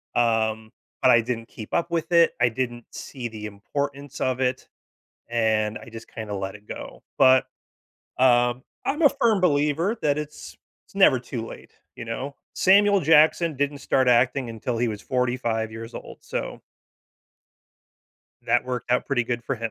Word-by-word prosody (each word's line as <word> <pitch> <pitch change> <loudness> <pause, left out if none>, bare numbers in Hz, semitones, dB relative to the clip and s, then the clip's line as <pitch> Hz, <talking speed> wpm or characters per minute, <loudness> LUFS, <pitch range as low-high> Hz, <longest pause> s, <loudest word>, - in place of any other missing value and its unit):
um, 110 -2 +1 0.3
but 130 - +6
I 120 - +6
didn't 115 0 -4
keep 110 -2 -10
up 170 - 0
with 165 0 -2
it, 170 -1 +5
I 120 - +5
didn't 120 0 -4
see 125 -4 -6
the 110 -1 -8
importance 140 +7 -5
of 130 -1 0
it, 130 0 -1 0.6
and 110 -2 +1
I - - -13
just 115 0 -10
kinda 110 -2 -6
let 95 0 -4
it 105 0 -22
go, - - -9
but, 130 -1 +5 0.7
um, 120 -1 +3 0.2
I'm 300 +4 -1
a 290 - +8
firm 230 -7 +2
believer 160 +4 +1
that 145 -1 +2
it's 150 0 -8 0.3
it's - - -24
never 190 -10 +5
too 120 -2 -5
late, - - -11 0.2
you 120 - -7
know? 130 +5 -5 0.2
Samuel 200 +1 +5
Jackson 160 0 +4
didn't 145 +1 -1
start 130 -1 +1
acting 125 +1 +3
until 115 +1 -4
he 120 0 +1
was 105 -2 -5
45 125 -3 -1
years 115 +1 -8
old, - - -9
so - - -5 1.8
that - - +2
worked 125 -1 -4
out 125 - +1
pretty 130 -4 +1
good 120 0 -3
for 135 - 0
him. 115 -1 -4
125 Hz, 170 wpm, -24 LUFS, 115-145 Hz, 1.8 s, a